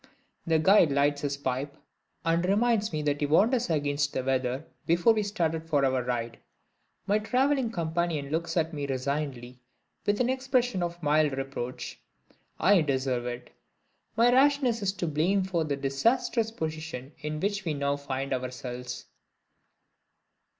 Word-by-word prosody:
The 165 -1 +4
guide 170 -1 +5
lights 140 +1 +2
his 140 -1 -2
pipe, 140 +1 -3 0.5
and 165 +1 +2
reminds 215 +3 +2
me 155 -2 -2
that 145 -1 0
he 145 - +2
warned 195 - +4
us 245 -5 +1
against 145 -2 0
the 130 - -1
weather 130 +2 -1 0.2
before 175 +7 +4
we 215 - 0
started 165 -6 -2
for 145 -3 +3
our 130 -1 +1
ride. 120 -2 -3 0.7
My 205 +2 +2
traveling 255 +3 +1
companion 165 -6 -2
looks 165 +1 -2
at 160 0 +1
me 145 -2 -3
resignedly, 130 -2 -3 0.5
with 205 0 +2
an 250 - +2
expression 255 -5 0
of 175 -1 -4
mild 150 -2 +2
reproach. 135 -2 -5 0.6
I 200 -3 +5
deserve 130 -4 -1
it. 120 0 -6 0.7
My 235 +2 +5
rashness 265 -3 +3
is 195 -1 +1
to 185 - -3
blame 170 +6 +1
for 175 -4 -1
the 145 -2 -1
disastrous 220 - +1
position 155 - -5
in 150 0 -4
which 200 +2 -1
we 160 -4 -2
now 140 0 0
find 135 -1 -3
ourselves. 125 - -5
155 Hz, 150 wpm, -28 LUFS, 135-200 Hz, 0.7 s, guide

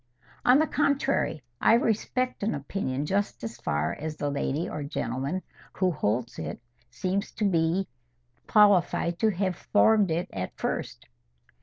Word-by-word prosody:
"On 250 +2 +6
the 310 - +4
contrary, 280 - 0 0.2
I - - +6
respect 245 +2 0
an 210 +2 0
opinion 145 -2 -3
just 200 -1 -1
as 115 +1 -5
far 75 -5 -1
as 155 0 -5
the 145 -1 -1
lady 140 +3 -1
or 150 - -5
gentleman 140 +4 -3 0.3
who 185 -1 +1
holds 120 -5 -1
it 80 0 -5 0.3
seems 185 - -2
to 215 - -1
me 175 0 +1 0.6
qualified 185 -4 +4
to 220 - +3
have 190 -2 -1
formed 210 -2 +3
it 170 +3 -1 0.3
first. - - -4
175 Hz, 140 wpm, -27 LUFS, 140-205 Hz, 0.6 s, On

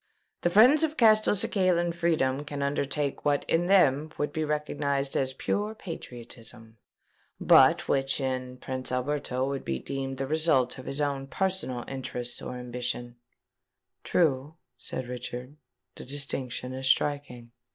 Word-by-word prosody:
"The 175 - +2
friends 245 - +6
of 315 -1 0
Castelcicalan 200 -5 +3
freedom 155 -5 +1
can 145 -1 -4
undertake 140 0 -1
what 145 -1 +1
in 170 +2 +2
them 155 -6 +4
would 145 0 -2
be 160 - -1
recognised 145 -2 -1
as 130 -1 0
pure 210 +9 -2
patriotism, 120 - -10 0.6
but - - +5
which 135 0 +1
in 130 -1 -3
Prince 130 0 -5
Alberto 130 0 -1
would 140 -1 -3
be 65 - -2
deemed 135 - -4
the 135 - -2
result 135 -4 +1
of 130 - -10
his 140 +2 -3
own 140 -2 -1
personal 185 -8 -2
interests 125 -2 -3
or 125 - -6
ambition." 120 0 -4 0.9
"True," 150 -2 +1 0.2
said 130 - -6
Richard: 125 +2 -7 0.4
"the - - -10
distinction 130 -2 -4
is 130 0 -3
striking." 130 -4 0
140 Hz, 135 wpm, -28 LUFS, 125-155 Hz, 0.9 s, friends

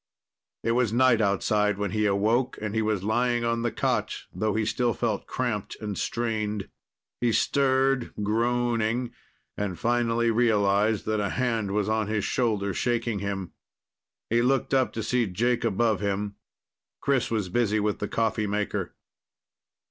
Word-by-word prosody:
It 115 - +1
was 120 -2 +2
night 120 -1 +4
outside 105 0 +1
when 100 -2 -2
he 105 -1 +1
awoke, 110 +6 +1
and 105 -1 -4
he 110 - +1
was 105 -3 0
lying 120 +2 +1
on 115 0 0
the 120 0 0
cot, - - 0 0.2
though 110 -1 -1
he 110 -1 +1
still 120 +2 0
felt 110 -4 -2
cramped 120 -6 -3
and 105 -2 -4
strained. 110 -3 -2 0.5
He 120 -1 +2
stirred, 135 0 +2
groaning, 120 +1 0 0.4
and 100 -4 -3
finally 120 +1 +1
realized 105 -2 +2
that 110 0 0
a 100 -1 0
hand 115 -5 -1
was 105 0 0
on 110 -1 0
his 105 -1 -1
shoulder 105 -5 0
shaking 115 +1 -1
him. 95 -3 -4 0.8
He 120 +1 +4
looked 130 +1 +1
up 130 -1 +3
to 110 - -3
see 120 +1 +1
Jake 115 +7 0
above 110 -1 +1
him. 100 0 -2 0.7
Chris 140 -3 +1
was 105 -5 -1
busy 110 0 +1
with 105 0 -1
the 105 - -2
coffee 110 -1 0
maker. 105 +1 -2
110 Hz, 155 wpm, -26 LUFS, 105-120 Hz, 0.8 s, night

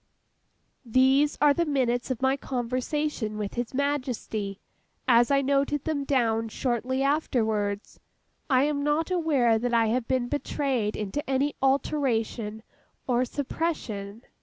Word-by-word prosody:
These 265 +4 +3
are 295 -1 +6
the 340 - +1
minutes 255 -5 0
of 260 -1 -3
my 265 +1 +3
conversation 255 -2 -2
with 210 -2 -4
His 240 -1 -3
Majesty, 250 -8 -2 0.5
as 240 -1 +5
I 280 -1 +3
noted 280 +1 +1
them 295 -3 -2
down 225 -5 +1
shortly 255 +3 -1
afterwards. 220 -8 0 0.5
I 260 -1 +4
am 290 -1 0
not 300 +4 0
aware 280 -10 +2
that 240 +1 0
I 225 -1 +3
have 240 +1 0
been 255 -2 0
betrayed 265 -6 -1
into 215 +9 -4
any 275 +2 +1
alteration 245 -5 0 0.4
or 250 0 +2
suppression. 235 -7 -4
260 Hz, 130 wpm, -27 LUFS, 230-285 Hz, 0.5 s, are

